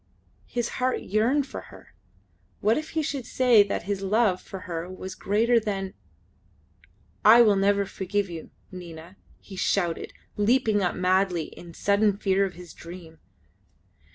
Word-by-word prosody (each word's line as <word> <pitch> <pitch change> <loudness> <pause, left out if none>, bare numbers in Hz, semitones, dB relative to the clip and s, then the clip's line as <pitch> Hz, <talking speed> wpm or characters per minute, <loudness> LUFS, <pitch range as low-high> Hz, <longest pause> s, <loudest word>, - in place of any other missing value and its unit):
His 240 -2 -2
heart 255 0 +1
yearned 235 +8 +1
for - - -7
her. - - -16 0.7
What 220 +2 +3
if 310 0 -4
he 315 - +2
should 275 -5 -4
say 250 -5 +5
that 200 0 -1
his 195 +1 -3
love 195 -1 +2
for 190 - -9
her 170 -1 -5
was 185 0 -7
greater 230 +5 +2
than... 195 -3 -3 1.3
"I 230 +3 +8
will 210 -3 +4
never 200 +1 +2
forgive 195 +1 -2
you, 165 -3 -8 0.2
Nina!" 175 0 -10 0.2
he 195 - -12
shouted, 175 -2 -1 0.3
leaping 215 -1 +2
up 180 - 0
madly 185 -2 +1
in 175 - -13
the 170 - -11
sudden 200 0 +2
fear 195 -1 +2
of 190 - -6
his 175 -1 -11
dream. 170 -2 -11
200 Hz, 155 wpm, -26 LUFS, 185-220 Hz, 1.3 s, I